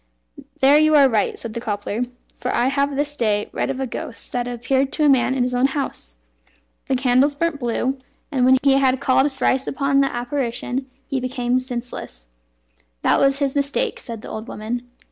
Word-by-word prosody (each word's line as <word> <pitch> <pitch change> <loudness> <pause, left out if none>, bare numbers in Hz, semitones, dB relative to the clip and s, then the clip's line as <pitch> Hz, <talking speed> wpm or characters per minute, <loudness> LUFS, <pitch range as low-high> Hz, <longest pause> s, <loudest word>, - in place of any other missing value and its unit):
"There 280 +3 +6
you 310 0 +4
are 280 -2 +7
right," 220 -5 0
said 230 -2 -7
the 235 - -4
cobbler, 205 +2 -2 0.3
"for - - -4
I 245 +2 +2
have 280 0 0
this 290 +1 -1
day 210 -5 0
read - - -1
of 270 -1 -3
a 265 - -1
ghost 260 0 -6
that 245 -1 -2
appeared 260 +3 0
to 305 - +1
a - - +6
man 260 -1 +3
in 255 - +1
his 250 0 -1
own 250 +2 +3
house. 270 - -4 0.7
The 265 - +1
candles 260 +2 +3
burnt 330 -1 -1
blue, 255 +2 -1 0.3
and 260 -4 +1
when 260 +1 +6
he 275 -1 +5
had 265 -1 +2
called 265 +3 +3
thrice 270 0 0
upon 275 0 +2
the 275 - +1
apparition, 245 +1 -3 0.2
he 270 - -1
became 250 -1 0
senseless." 240 - -7 0.7
"That - - +3
was 275 0 +3
his 280 -1 -1
mistake," 290 - 0
said 230 -3 -8
the - - -8
old 220 +2 -6
woman. 240 +3 -5
260 Hz, 195 wpm, -21 LUFS, 240-275 Hz, 0.7 s, are